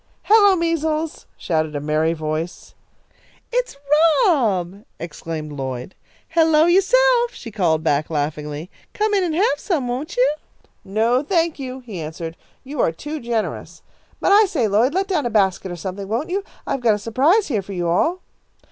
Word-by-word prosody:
"Hello, 410 -2 +6
Measles," 320 -2 -1
shouted 155 -2 -1
a - - -1
merry 155 +2 +1
voice. 155 +2 -4 0.8
"It's - - -1 0.5
Rob!" 205 - +1 0.2
exclaimed 160 -1 -6
Lloyd. 130 +1 -5 0.4
"Hello 320 -1 +4
yourself!" 480 +7 +4
she 230 - -9
called 170 -6 +1
back, 150 -1 +1
laughingly. 150 +2 -3 0.2
"Come 425 0 +1
in 390 -2 +3
and 330 -3 -1
have 330 -5 +2
some, 310 -10 -1
won't 260 +6 -4
you?" 260 +4 +4 0.5
"No, 225 +6 +1
thank 330 0 0
you," 260 -1 -6
he 215 -9 -7
answered. 160 +1 -6 0.3
"You 270 -1 -3
are - - +2
too 295 - -6
generous. 235 -3 -4 0.4
But - - +1
I 420 +2 +7
say, 280 - 0
Lloyd, 230 - +2
let 385 +1 +1
down 320 -10 0
a - - -2
basket 190 -4 +1
or - - -4
something, 190 +3 -6
won't 235 - -2
you? 395 +2 -1 0.2
I've 270 - -2
got 225 -3 +4
a - - -3
surprise 275 - +2
here 220 -7 0
for 195 +1 -9
you 175 -2 -2
all." 325 - +1
235 Hz, 165 wpm, -21 LUFS, -, 0.8 s, I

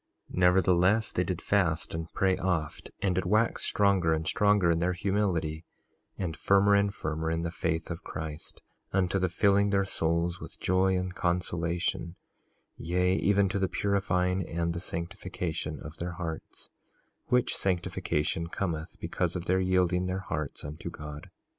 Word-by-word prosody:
3:35 - - -6
Nevertheless 90 +4 +4
they 90 - +1
did 90 -2 -3
fast 90 -6 +1
and 80 0 -4
pray 95 -1 +2
oft, 85 -5 -2
and 95 -2 +2
did 95 - 0
wax 110 +4 +2
stronger 95 -5 +3
and 80 0 -3
stronger 100 -2 +3
in 85 - +1
their 90 +2 +1
humility, 90 -5 -1 0.5
and 85 -5 -3
firmer 100 +2 +4
and 100 0 +3
firmer 80 -1 -2
in 80 0 -1
the 85 - -2
faith 80 0 -2
of 85 +3 -6
Christ, 80 0 -6 0.3
unto 95 0 +1
the 95 0 +1
filling 100 +2 +3
their 100 -1 +2
souls 85 -1 0
with - - -10
joy 95 +1 +2
and 90 0 -3
consolation, 85 -1 -1 0.6
yea, 90 +3 +1
even 100 0 +3
to 100 - -1
the 95 -1 +1
purifying 95 -2 +1
and 85 0 -1
the 85 - -3
sanctification 85 -3 -4
of 80 +1 -9
their 85 +1 -4
hearts, 80 -2 -6 0.6
which 125 -1 +2
sanctification 85 -3 -1
cometh 85 -3 -3
because - - -1
of 90 -1 -3
their 95 +1 +2
yielding 90 -1 +2
their 95 +1 -2
hearts 75 -7 -4
unto 75 +1 -6
God. 75 0 -9
90 Hz, 160 wpm, -29 LUFS, 85-95 Hz, 0.6 s, Nevertheless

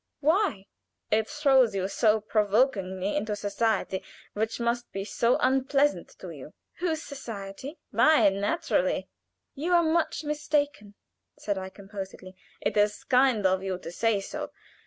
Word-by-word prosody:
Why?" 310 - +1 0.5
"It 220 0 +2
throws 270 -7 +3
you 190 -1 0
so 215 +1 +2
provokingly 205 -3 +1
into 210 +1 -1
society 205 -1 -1 0.3
which 220 +3 -2
must 235 +1 -1
be 195 0 -4
so 235 +3 +2
unpleasant 270 +3 +1
to - - -8
you." - - -11 0.2
"Whose 325 -3 -1
society?" 235 - -7
"Mine, 220 -11 +4
naturally." 330 +10 0 0.4
"You 325 +6 -1
are 345 -1 +5
much 320 -1 +1
mistaken," 295 -7 -1 0.4
said 205 -2 -2
I, 190 0 -6
composedly. 195 -1 -9 0.3
"It - - -1
is 205 0 +2
kind 250 -5 +3
of 190 0 +3
you 190 -1 -2
to 170 -2 -8
say 225 +3 +1
so. - - -5
220 Hz, 135 wpm, -27 LUFS, 200-285 Hz, 0.5 s, are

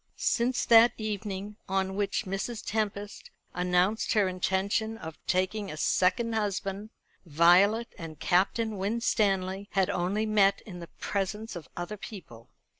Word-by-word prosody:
Since 245 +1 +1
that 230 0 +7
evening 210 -1 -4
on 190 0 0
which 200 0 -1
Mrs. 195 +4 -4
Tempest 205 -1 -3 0.2
announced 180 +4 +1
her 210 -3 +3
intention 195 +4 -1
of 160 -5 -9
taking 190 +3 0
a 155 - -7
second 190 +9 +1
husband, 205 -1 -2 0.4
Violet 180 +9 +4
and 160 -3 -8
Captain 210 +3 +1
Winstanley 200 -2 0
had 195 0 +2
only 190 +5 -1
met 205 -2 +3
in 180 -4 -10
the 170 - -8
presence 210 +2 -3
of 170 - -9
other 175 +5 -5
people. 125 - -11
195 Hz, 130 wpm, -28 LUFS, 185-215 Hz, 0.4 s, that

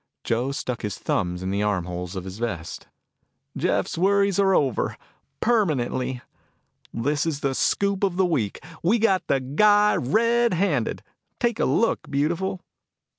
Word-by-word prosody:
Joe 120 +4 0
stuck 125 -3 -4
his 105 -3 -4
thumbs 90 0 -2
in 95 - -2
the 100 +1 0
arm 100 -4 0
holes 90 +1 -5
of 95 - -4
his 95 +2 -8
vest. 100 -9 -4 0.7
"Jeff's - - -1
worries 200 +1 +3
are 195 -1 +4
over, 135 -5 0 0.4
permanently. 130 - 0 0.7
This 145 +7 -1
is 145 -3 -2
the 135 -1 0
scoop 200 +7 0
of 190 -3 +1
the 190 0 +3
week. 135 - -1 0.2
We 200 +8 +3
got 205 -4 +1
the 135 - +2
guy 205 +10 +4
red 230 - +2
handed. 145 - 0 0.4
Take 235 -2 0
a - - +2
look, 230 - +1
beautiful." 170 +6 -1
145 Hz, 150 wpm, -24 LUFS, -, 0.7 s, are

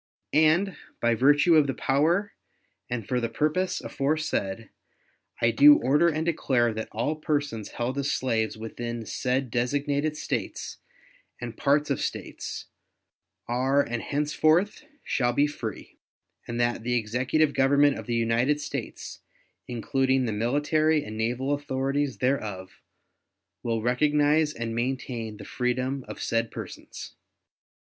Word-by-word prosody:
And, 160 +4 +3 0.2
by 120 0 +2
virtue 145 +8 +4
of 150 -2 +5
the 135 - -2
power 165 +9 +1 0.6
and 120 -4 -3
for 125 - 0
the 115 - -1
purpose 155 +9 0
aforesaid, 135 -8 -2 0.7
I 115 - +3
do 145 +5 +8
order 145 +7 +3
and 160 -1 0
declare 130 -8 +1
that 110 0 -5
all 120 +8 -1
persons 145 -8 -2
held 125 +4 -2
as 140 0 0
slaves 110 -4 0
within 115 +1 -5
said 125 +2 -1
designated 145 +5 0
States - - -4 0.6
and 120 -2 -6
parts 145 +3 +2
of 135 - 0
States - - -5 0.8
are 130 +4 +2
and 120 -1 -3
henceforth 155 - +1 0.2
shall 120 -2 0
be 140 +4 +3
free; 120 -8 -6 0.5
and 120 0 -4
that 120 -1 +1
the 125 +2 -1
Executive 130 +7 +1
Government 140 +1 +4
of - - -9
the 120 - -1
United 115 +5 +2
States, 150 - -6 0.5
including 130 +2 +1
the 110 - -1
military 145 +7 +1
and 110 - -7
naval 120 +5 -1
authorities 140 -1 -1
thereof, 105 -9 -2 0.8
will 115 -2 -1
recognize 150 +4 +3
and 115 -5 -4
maintain 120 -2 -3
the 100 - -10
freedom 130 +3 -1
of - - -8
said 115 0 0
persons. - - -8
130 Hz, 130 wpm, -26 LUFS, 120-145 Hz, 0.8 s, do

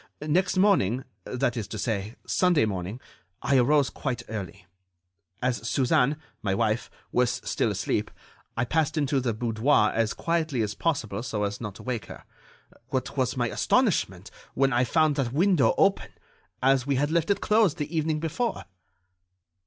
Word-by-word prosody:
Next 180 +6 +1
morning, 155 - +3 0.2
that 125 -1 -1
is 110 -5 -3
to 110 - -6
say, 105 0 -2
Sunday 175 -10 +3
morning, 100 +2 -4 0.4
I 140 - +3
arose 140 +2 +3
quite 125 -5 -3
early. 95 -5 -6 0.8
As 120 -3 -1
Suzanne, 130 +2 +2 0.2
my 95 -2 0
wife, 110 +1 0 0.2
was 125 -1 +1
still - - 0
asleep, - - -1 0.5
I 120 - +1
passed 160 +4 0
into 140 -2 +1
the 125 -2 0
boudoir 110 +1 +2
as 110 -1 0
quietly 160 -8 0
as 105 -1 -2
possible 115 -9 -2
so 115 -4 -3
as 100 +2 -3
not 105 -4 -5
to - - -11
wake 120 -7 -3
her. - - -10 0.6
What - - -3
was - - 0
my - - +1
astonishment - - +1 0.2
when 135 0 +2
I 125 +1 +3
found 155 +2 +2
that 125 -3 -1
window 165 - +3
open—as 195 - 0
we 140 - +2
had 145 +3 0
left 170 +1 +1
it 200 - +2
closed 210 -6 +3
the 150 +3 -4
evening 155 -1 0
before!" 165 +10 -2
130 Hz, 160 wpm, -26 LUFS, 115-155 Hz, 0.8 s, morning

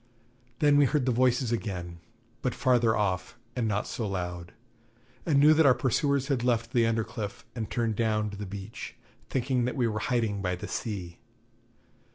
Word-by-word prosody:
Then 145 0 +4
we 145 - +6
heard 140 0 +1
the 130 - +2
voices 125 0 +2
again, 90 -6 -4 0.4
but 125 - -1
farther 120 -4 +3
off, 95 +1 -1 0.2
and 120 -3 0
not 105 -1 0
so 115 - -3
loud; 90 -2 -4 0.8
and 145 -4 +4
knew 150 +2 +7
that 160 -1 +5
our 130 - +6
pursuers 135 +2 +1
had 135 -5 0
left 115 -1 0
the 115 -2 +4
under 115 0 +1
cliff 105 -2 -6
and 110 -3 -4
turned 115 -3 -1
down 110 -2 +1
on 105 - -2
to 100 - -8
the 105 0 -5
beach, 100 +3 -7 0.3
thinking 130 -1 0
that 125 - -2
we 120 -2 +2
were 110 -1 -2
hiding 115 -4 0
by 90 -2 -1
the 90 - -7
sea. 90 -6 -5
115 Hz, 190 wpm, -28 LUFS, 100-125 Hz, 0.8 s, knew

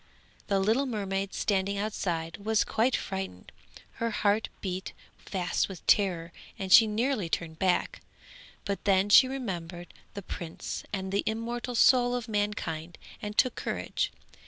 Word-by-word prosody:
The 200 -1 +2
little 225 +8 +2
mermaid 195 -4 -2
standing 200 0 0
outside 175 -6 -2
was 215 +2 +1
quite 235 +3 +1
frightened, 190 - -5 0.5
her 230 - +1
heart 210 0 +1
beat 185 0 -4 0.3
fast 185 0 -1
with 190 -3 -9
terror 175 -5 +2 0.3
and 190 -1 +1
she 225 - +9
nearly 215 -3 0
turned 160 -1 -3
back, 185 -2 +1 0.6
but 200 -1 -3
then 195 0 +3
she 255 +5 +8
remembered 175 -10 -5 0.2
the 200 - -6
prince 170 -2 -6
and 190 -2 -3
the 200 - +2
immortal 235 +2 -3
soul 245 0 +5
of 245 -3 -3
mankind 205 -6 -2 0.2
and 210 0 -5
took 255 -3 +4
courage. - - -2
200 Hz, 140 wpm, -29 LUFS, 185-220 Hz, 0.6 s, she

